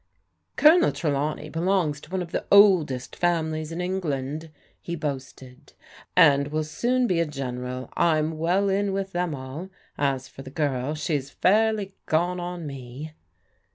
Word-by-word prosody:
" - - -49
Colonel 330 +3 +6
Trelawney 150 0 -2
belongs 165 -3 0
to - - -14
one 185 0 -2
of 170 - -11
the - - -3
oldest 175 -11 +5
fam 170 -2 +1
ilies 155 0 -4
in 170 +2 -3
England," 160 -4 -3 0.3
he 170 - -4
boasted, 135 -2 -7 0.2
" - - -22
and 140 -5 +6
will 155 +1 -1
soon 245 +11 0
be 180 -7 +1
a 170 - +2
Gen 135 -4 -4
eral. 125 +1 -5
I'm 155 -1 +1
well 180 +5 +2
in 195 0 +1
with 195 0 -2
them 175 -4 -1
all. 135 +7 -7 0.3
As 135 -2 0
for - - -12
the 135 - -9
girl, 140 -1 -1
she 155 +1 -2
is 140 -2 -1
fairly 210 +3 +2
gone 175 +3 +1
on 175 -1 -5
me." 135 +2 -7
155 Hz, 170 wpm, -25 LUFS, 140-180 Hz, 0.3 s, Colonel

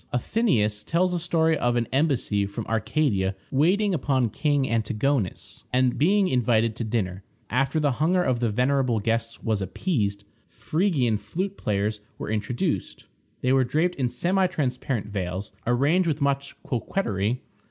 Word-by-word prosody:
Athenæus 120 - +1
tells 180 +2 +1
a 175 - 0
story 160 -1 +2
of 120 -4 +1
an 120 -1 +1
embassy 130 -8 +1
from 105 +2 -6
Arcadia 110 -3 0 0.2
waiting 185 +9 +3
upon 130 -6 +1
King 145 -1 +1
Antigonus, 115 0 -1
and 125 0 +2
being 195 +6 +4
invited 115 -5 +2
to 115 - -3
dinner. 100 -4 -2 0.3
After 135 +5 +1
the 145 -2 +2
hunger 170 +7 +2
of 130 -5 +1
the 120 -1 +1
venerable 125 +1 +1
guests 115 +2 -2
was 110 -3 0
appeased, 100 - -1 0.3
Phrygian 130 - 0
flute 190 - -4
players 105 - -1 0.2
were - - -5
introduced. 110 +3 -2 0.4
They 130 +1 +2
were 135 -1 +4
draped 160 +8 +1
in 130 -6 -1
semi 185 +7 +1
transparent 130 - -2
veils, 95 -1 -4 0.2
arranged 145 +9 +3
with 155 -2 0
much 140 -1 -1
coquetry. 115 - -1
125 Hz, 145 wpm, -25 LUFS, 110-155 Hz, 0.4 s, being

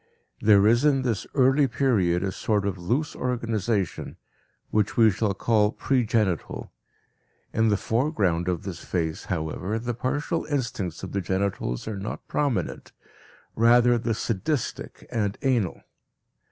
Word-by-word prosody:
There 105 -2 +6
is 120 +4 +4
in 140 -3 +3
this 115 -6 -1
early 135 +1 +4
period 110 -8 +1
a 95 - -1
sort 105 +1 0
of 95 -2 -2
loose 125 - -1
organization, 115 -5 -2 0.5
which 105 -1 +1
we 110 -2 +6
shall 100 0 -1
call 105 0 +2
pre 125 -2 0
genital. 105 -7 -1 0.8
In 110 +1 +3
the 105 -2 +3
foreground 105 - 0
of 90 -3 -1
this 95 -4 -6
phase, 80 -3 -2
however, 90 +4 -2
the 120 +1 -3
partial 145 +7 -2
instincts 115 - -3
of 95 - -5
the 100 - -1
genitals 95 - -2
are 105 -3 -4
not 100 - -6
prominent, 130 - -2 0.6
rather 120 +1 +5
the 115 -1 -1
sadistic 115 +6 -3
and 105 -3 -1
anal. 120 -9 +1
110 Hz, 140 wpm, -25 LUFS, 95-125 Hz, 0.8 s, There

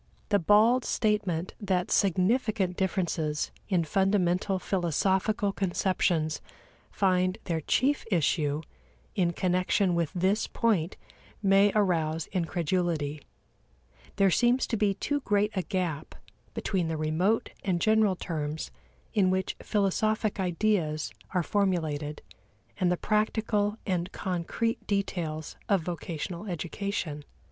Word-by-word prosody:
The 205 -1 +4
bald 215 +7 +5
statement 200 -5 0
that 185 -3 0
significant 195 0 +2
differences 170 -6 -1 0.2
in 180 -4 +2
fundamental 190 +2 +1
philosophical 190 +4 +1
conceptions 175 -4 0 0.5
find 185 0 +1
their 165 -3 -2
chief 275 - +1
issue 155 -4 +1 0.5
in 175 -2 +1
connection 185 +1 +1
with 170 -3 0
this 190 +4 +1
point 195 -7 0 0.5
may 195 +1 +5
arouse 165 -6 +1
incredulity: 170 -4 -1 0.9
there 195 -2 +4
seems 245 +6 +3
to - - -2
be 205 -2 +1
too 290 +8 -1
great 210 -4 +1
a 190 - 0
gap 175 -6 -3 0.4
between 185 -5 -1
the 160 -1 -2
remote 160 +8 +1
and 180 -3 0
general 215 -1 +3
terms 155 -3 -4 0.4
in 200 -5 +3
which 185 0 0
philosophic 215 +1 0
ideas 175 -4 0 0.2
are 180 - +3
formulated 155 -6 -1 0.6
and 180 -2 +2
the 180 - +1
practical 215 0 0
and 180 -1 -1
concrete 190 +6 -2
details 170 -6 -2
of 200 -4 +3
vocational 170 +2 -5
education. 175 -3 -3
185 Hz, 110 wpm, -28 LUFS, 170-205 Hz, 0.9 s, bald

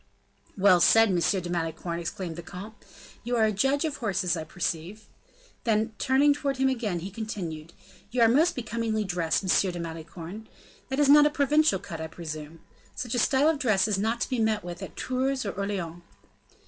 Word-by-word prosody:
"Well 190 -2 +5
said, 225 +3 +6
M. 185 - +1
de 175 +1 0
Malicorne," 170 0 -3
exclaimed 170 0 -5
the 170 - -6
comte; 185 +5 -9 0.5
"you 245 +2 -1
are 225 -2 +4
a 215 - +2
judge 270 - +1
of 295 -2 -3
horses, 190 -6 0
I 160 - -4
perceive;" 175 +5 -4 0.6
then, 220 0 +1
turning 275 +2 +4
towards 280 -1 -2
him 265 0 +3
again, 215 -9 -2
he 190 +3 -6
continued, 175 -7 -6 0.4
"you 245 0 0
are - - +7
most 315 +9 +3
becomingly 230 -2 -2
dressed, 175 -2 0
M. 185 0 +2
de 175 - -6
Malicorne. 165 +5 -7 0.4
That 265 - -2
is 290 - +4
not 295 +1 +8
a - - +2
provincial 295 -4 +3
cut, 165 -3 -8
I 160 - -4
presume. 155 -1 -8 0.3
Such 240 -2 -4
a 245 - +1
style 270 +5 +3
of 320 -3 +2
dress 215 -7 +2
is 205 -3 0
not 225 +3 0
to - - -1
be 255 - -1
met 220 -3 +1
with 175 +1 -7
at 190 - -8
Tours 260 0 -1
or 200 - -1
Orleans." 190 -4 -4
205 Hz, 195 wpm, -27 LUFS, 175-250 Hz, 0.6 s, not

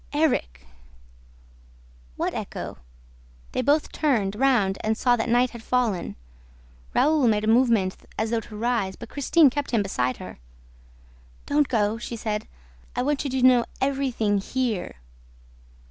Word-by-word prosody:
"Erik!" 280 - 0 1.5
What - - -2
echo?... - - -6 0.7
They - - -1
both 290 +3 +2
turned 225 -10 0
round 220 -6 +2
and 220 0 0
saw 245 0 +3
that 235 0 -2
night 245 +1 +3
had 235 - -9
fallen. 225 -7 -1 0.8
Raoul 300 -4 +4
made 210 -1 +2
a - - -1
movement 225 -5 +3 0.2
as 220 +1 -1
though 230 - +1
to 215 -1 -10
rise, 225 -4 0
but 235 - -10
Christine 290 +1 +4
kept 285 +1 -3
him 225 -4 +1
beside 125 -10 -1
her. - - -10 1.1
"Don't 290 0 +2
go," 220 -2 0
she 235 - -5
said. 215 -1 -3 0.5
"I 250 - 0
want 290 +1 0
you 280 - -2
to 260 -1 -1
know 250 -2 +6 0.2
everything 260 -7 0
HERE!" 235 -2 -2
235 Hz, 145 wpm, -25 LUFS, 210-265 Hz, 1.5 s, know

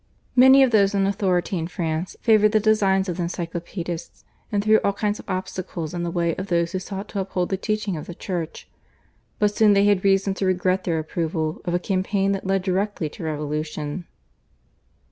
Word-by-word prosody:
Many 265 +2 +8
of 260 - +3
those 200 -2 +4
in 195 -1 +2
authority 190 -2 0
in 165 - -3
France 165 0 -3
favoured 215 -2 +4
the 215 - +5
designs 200 -3 +2
of 175 -1 -3
the - - -2
Encyclopaedists, 170 0 -5 0.3
and 205 -1 0
threw 215 +1 +5
all 200 - 0
kinds 205 +1 -1
of - - -12
obstacles 185 -3 -4
in 175 - -3
the 175 - -2
way 170 -1 0
of 190 - -4
those 170 -2 +1
who 185 - -2
sought 195 +2 -6
to 200 - -3
uphold 185 -2 -2
the 190 - 0
teaching 215 -1 -2
of 155 - -7
the 175 - -7
Church, 175 -4 -5 0.7
but 210 0 +1
soon 215 -2 +5
they 200 0 +4
had 205 -2 +3
reason 195 0 +3
to 190 - -2
regret 185 0 +1
their 165 -2 0
approval 160 0 -2
of 175 - 0
a - - +2
campaign 195 +1 0
that 195 -1 -3
led 195 -1 +1
directly 190 -3 -1
to - - -10
revolution. 150 +1 -4
185 Hz, 200 wpm, -23 LUFS, 170-200 Hz, 0.7 s, Many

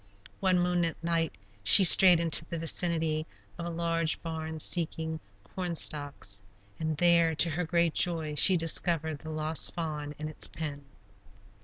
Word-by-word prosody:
One 185 -2 +1
moonlight 175 -2 -1
night 165 -4 -2 0.3
she 195 - +8
strayed 180 -1 +7
into 165 -1 -1
the 170 - -7
vicinity 160 -1 0 0.3
of 170 - -6
a - - -5
large 165 -1 -2
barn 160 -1 -7
seeking 160 -1 -2 0.3
corn 180 -2 -5
stalks, 145 -11 0 0.4
and 160 -1 -4
there, 170 -1 +2
to 165 +2 +3
her 175 +4 -3
great 170 0 0
joy, 165 -4 -1
she 180 +5 +6
discovered 165 -2 0
the 160 - -11
lost 155 0 0
fawn 150 -3 -6
in 155 - -7
its 155 - -5
pen. 145 -3 -8
165 Hz, 150 wpm, -27 LUFS, 155-170 Hz, 0.4 s, she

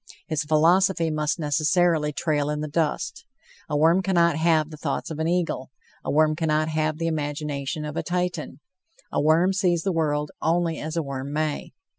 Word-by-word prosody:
His 155 -4 -1
philosophy 165 +3 +3
must 150 -1 0
necessarily 155 +1 +2
trail 150 -1 -1
in 150 0 -2
the 155 - -3
dust. 155 0 -2 0.5
A 150 - 0
worm 165 +5 +4
cannot 170 -4 +3
have 160 -1 +2
the 155 - -8
thoughts 150 +2 -3
of 155 - -5
an 160 - 0
eagle; 170 -7 -1 0.3
a - - -4
worm 155 +1 +3
cannot 155 -1 0
have 155 0 0
the 165 - -2
imagination 150 -2 -3
of 150 0 -6
a - - 0
Titan; 180 -4 -3 0.5
a - - 0
worm 165 +5 +4
sees 180 -3 +1
the 195 - 0
world 150 -2 0
only 165 0 +1
as 155 +2 -4
a 165 - +1
worm 140 0 -5
may. 155 0 -2
155 Hz, 180 wpm, -24 LUFS, 150-170 Hz, 0.5 s, worm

